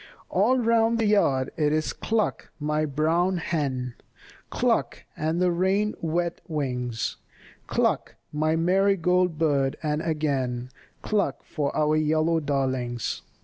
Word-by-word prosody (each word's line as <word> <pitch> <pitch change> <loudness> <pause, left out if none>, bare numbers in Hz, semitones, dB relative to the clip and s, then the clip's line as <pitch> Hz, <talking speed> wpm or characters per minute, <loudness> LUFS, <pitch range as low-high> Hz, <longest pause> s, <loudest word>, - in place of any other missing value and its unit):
All 220 +8 +3
round 230 -1 +3
the 225 - +1
yard 140 -11 +2
it 150 -2 +2
is 155 0 0
cluck, 220 -2 -1
my 150 +1 0
brown 165 +6 +1
hen, 135 -7 -2 0.6
Cluck, - - 0
and 160 +2 -1
the 180 -1 +3
rain 190 +4 +1
wet 170 +1 -1
wings, 125 - -2 0.5
Cluck, - - 0 0.2
my 155 +1 +1
marigold 180 -1 +2
bird, 145 -3 +1
and 150 0 0
again 135 -6 -1 0.3
Cluck 210 -2 0
for 145 -4 -2
your 155 0 +3
yellow 155 +2 +2
darlings. 130 -5 -2
155 Hz, 120 wpm, -26 LUFS, 140-180 Hz, 0.6 s, All